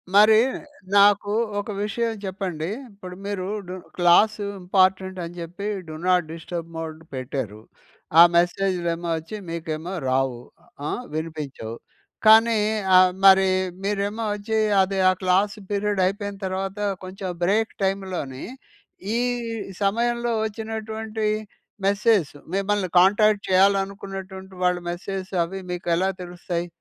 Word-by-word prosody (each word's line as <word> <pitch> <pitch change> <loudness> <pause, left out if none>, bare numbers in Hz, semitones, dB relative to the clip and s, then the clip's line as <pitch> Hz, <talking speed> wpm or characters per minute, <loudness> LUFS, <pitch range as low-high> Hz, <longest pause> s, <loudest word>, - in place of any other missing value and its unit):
మరి 215 +2 +8 0.6
నాకు 205 0 +5 0.3
ఒక 205 - -5
విషయం 230 +3 -1
చెప్పండీ. 185 -4 -3 0.2
ఇప్పుడు 185 -3 -10
మీరు 200 -2 -3 0.2
డు 180 - -6 0.2
క్లాసు 205 +5 +4 0.2
ఇంపార్టెంటని 185 -1 +1
చెప్పి 180 +4 -7 0.2
డు 155 - -7
నాట్ 180 -2 +3
డిస్టర్బ్ 165 0 -6
మోడ్ 160 -1 -5
పెట్టారు. 130 -5 -4 0.6
ఆ - - +12
మెసేజ్‌లేమో 175 -1 +1
వచ్చి, 160 +6 -7
మీకేమో 165 +1 -4 0.2
రావు 130 -2 0 0.5
ఆహ్, 245 - -3
వినిపించవు. 150 -8 -5 0.5
కానీ 225 +1 +7 0.4
ఆహ్, 185 0 +6
మరి 190 0 +7 0.4
మీరేమో 205 +2 -1
వచ్చి 210 +2 -1 0.2
అది 195 +1 0
ఆ - - +5
క్లాస్ 190 +3 +2 0.2
పీరియడ్ 205 -1 0
అయిపోయిన 200 +1 -2
తర్వాత 190 +1 -3 0.3
కొంచెం 185 +1 -6
బ్రేక్ 215 +5 +1
టైమ్‌లోనీ 190 -9 -2 0.7
ఈ - - +1 0.6
సమయంలో 235 +3 +1
వచ్చినటువంటి 220 0 -4 0.6
మెసేజ్ 205 -4 +3 0.3
మిమ్మల్ని 195 0 0
కాంటాక్ట్ 205 +2 +4
చేయాలనుకున్నటువంటి 195 0 0
వాళ్ళ 180 0 +3
మెసేజెస్ 190 +2 -6
అవి 190 +3 -6
మీకెలా 175 +1 0
తెలుస్తాయి? 175 -1 -4
190 Hz, 110 wpm, -24 LUFS, 175-205 Hz, 0.7 s, ఆ